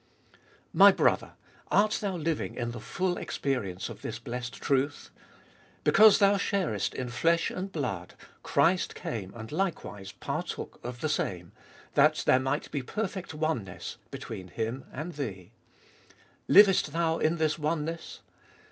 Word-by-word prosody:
My - - +9
brother! - - +1 0.4
art 210 +1 +3
thou 200 -3 -1
living 165 -2 -2
in 120 -1 -3
the 120 - -7
full 180 -1 -2
experience 105 -10 -2
of - - -9
this 110 - -4
blessed 125 +1 -5
truth? 140 +1 -1 0.7
Because 215 0 +7
thou 200 -1 +4
sharest 190 - -1
in 125 -1 -3
flesh 165 +7 +2
and 190 +2 -5
blood, 115 - -4 0.3
Christ 180 +2 +2
came 100 -5 -5
and 110 -1 -8
likewise 150 - -3
partook - - -5
of 120 0 -6
the - - 0
same, 90 - -2 0.4
that - - +4
there 130 - +5
might 135 +3 -2
be 145 - -2
perfect 190 - -4
oneness 150 - -3
between 95 -1 -7
Him 115 +7 -4
and 155 +6 -5
thee. 105 - -6 1.0
Livest 195 -7 +6
thou 165 -1 +1
in 160 +2 +2
this 160 0 0
oneness? 160 +2 -3
150 Hz, 140 wpm, -29 LUFS, 120-170 Hz, 1.0 s, My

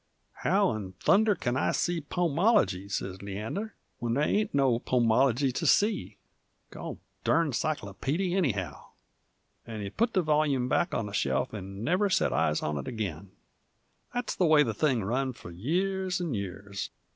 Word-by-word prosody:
"How - - +3
in 100 -4 -5
thunder 205 - +3
kin 120 -6 -2
I - - +1
see 175 -2 0
Pomology," 170 - +1
sez 95 -2 -4
Leander, 110 - -5 0.2
"when 120 -1 -1
there 145 - +2
ain't 210 +7 +1
no 135 -4 +2
Pomology 125 +2 +2
to 165 +5 -1
see? 205 +7 +2 0.5
Gol - - -7 0.3
durn 165 -2 +3
a - - -4
cyclopeedy, 150 - -1
anyhow!" 125 - -1 0.8
And 110 -2 -5
he 100 - -5
put 230 - 0
the 185 - +2
volyume 150 -5 +2
back 175 +7 +1
onto 105 -2 -2
the - - -13
shelf 70 -4 0
'nd 100 +1 -7
never 185 - +2
sot - - +2
eyes 75 - +1
into 75 -1 -1
it - - -11
ag'in. 100 -5 -4 0.8
That's 245 -2 -2
the 180 - +2
way 155 -1 +6
the 115 - -2
thing 125 -1 +1
run 130 +6 -1
f'r 90 -7 -11
years 185 - -1
'nd 170 -6 -2
years. 100 +1 -5
130 Hz, 165 wpm, -29 LUFS, -, 0.8 s, way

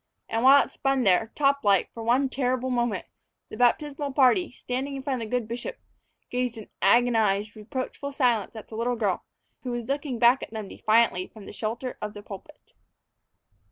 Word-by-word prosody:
And 225 - 0
while 275 +3 +7
it - - -15
spun 270 -2 0
there, 195 +2 +3
top 280 -1 +2
like, 200 -3 +3
for 230 - -7
one 245 +4 +2
terrible 255 -1 -1
moment, 240 -3 0 0.4
the - - -8
baptismal 280 +3 +1
party, 280 +6 +4
standing 260 +3 -4
in 270 - -6
front 265 -3 -2
of 220 - -5
the 250 - +1
good 225 - -9
bishop, 245 - -5 0.5
gazed 250 -1 -1
in 220 - -10
agonized, 215 -1 +3
reproachful 260 +5 -5
silence 240 -7 +1
at 220 - -9
the 220 - -8
little 240 +2 0
girl, 205 -6 -1 0.4
who 255 - -5
was 240 -1 -3
looking 275 -1 -2
back 240 +3 +5
at - - -6
them 215 -2 -6
defiantly 215 -3 +2
from 215 -3 -13
the - - -9
shelter 235 +4 -4
of 210 0 -5
the 205 - -9
pulpit. 210 +10 -12
245 Hz, 190 wpm, -26 LUFS, 220-265 Hz, 0.5 s, while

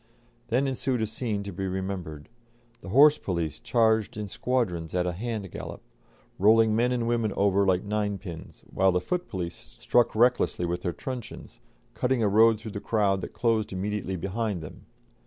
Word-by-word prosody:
Then 125 +4 +1
ensued 130 -3 -1
a - - +2
scene 110 -2 -3
to 100 - -6
be 95 +2 -3
remembered; 95 -5 -5 0.5
the - - -9
horse 145 +7 +6
police 85 -5 -3
charged 110 -3 +1
in 105 -1 -4
squadrons 90 -8 -2
at 90 -1 +1
a 90 - 0
hand 105 0 -4
gallop, - - -7 0.6
rolling 110 +2 +5
men 120 +2 +2
and 120 -2 -1
women 115 -3 +1
over 100 0 +2
like 90 -1 +2
ninepins, 100 -5 -4
while 95 0 +3
the 90 - +1
foot 180 - -3
police 85 -2 -4 0.3
struck 120 -2 +2
recklessly 120 -6 +2
with 85 +1 -2
their 90 - -1
truncheons, 125 - -8 0.3
cutting 125 -2 0
a - - +3
road 110 +2 +5
through 110 0 -7
the 100 - -5
crowd 100 -4 +1
that - - -7
closed 115 -3 0
immediately 95 0 -3
behind 100 0 -3
them. 75 - -11
105 Hz, 175 wpm, -27 LUFS, 95-115 Hz, 0.6 s, horse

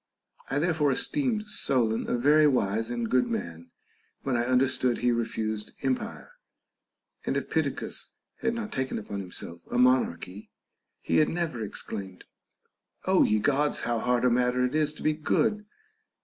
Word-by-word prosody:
I 135 - 0
therefore 155 -2 +2
esteemed 240 - 0
Solon 120 - 0
a - - +1
very 150 +5 +5
wise 115 -4 +1
and 120 -1 -2
good 125 +2 +2
man, 85 - -5 0.5
when 135 - 0
I 120 +1 0
under 130 +1 +4
stood 130 -2 +1
he 125 0 +2
refused 110 -2 -2
empire; 135 - -2 0.9
and - - -1
if - - -4
Pittacus - - -2 0.3
had 230 - -1
not 225 -2 -4
taken 130 0 -2
upon 100 -1 -5
himself 85 -2 -8
a 120 - -1
monarchy, 110 -6 +1 0.5
he - - +1
had 155 - +4
never 165 -9 -2
exclaimed, 100 -3 -6 0.8
Ο - - +4
ye 105 0 +3
( - - -4
rods! 145 +1 +1
how 120 -1 0
hard 125 +1 +1
a 125 - +4
matter 125 +1 +2
it 125 - -2
is 155 -1 +2
to - - -9
be 155 - +3
good 210 +7 0
125 Hz, 165 wpm, -28 LUFS, 110-150 Hz, 0.9 s, very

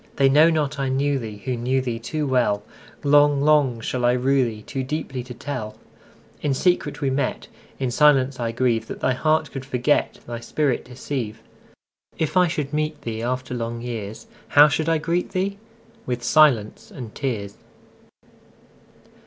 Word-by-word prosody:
They 135 -1 +4
know 150 +4 +6
not 150 -4 -1
I 135 -1 0
knew 140 +1 +1
theeWho 115 +2 -5
knew 130 +3 +1
thee 120 -3 -3
too 150 +6 -3
well:Long, 140 +4 +1
long 145 -5 +3
shall 125 +2 -3
I 120 0 +4
rue 130 0 +2
theeToo 115 +4 -6
deeply 135 -3 -3
to 125 0 -9
tell.In 135 +2 -6
secret 180 +4 0
we 135 -2 +1
met:In 135 -1 -4
silence 135 -1 +4
I 115 -1 -1
grieveThat 115 -1 -1
thy 130 - +1
heart 155 +3 +1
could 135 - -6
forget, 130 +2 0
Thy 120 -1 -5
spirit 130 +3 -1
deceive. 125 -3 -5 0.7
If 160 +1 -2
I 180 -1 +5
should 150 -4 -3
meet 150 -1 -2
theeAfter 125 +3 -3
long 115 0 -4
years, 110 -3 -6 0.2
How 145 +1 +7
should 155 +2 0
I 165 - +3
greet 170 +4 -2
thee?—With 200 - -5
silence 125 -6 +3
and 120 -6 -9
tears. 105 -7 -3
130 Hz, 145 wpm, -23 LUFS, 120-150 Hz, 0.7 s, How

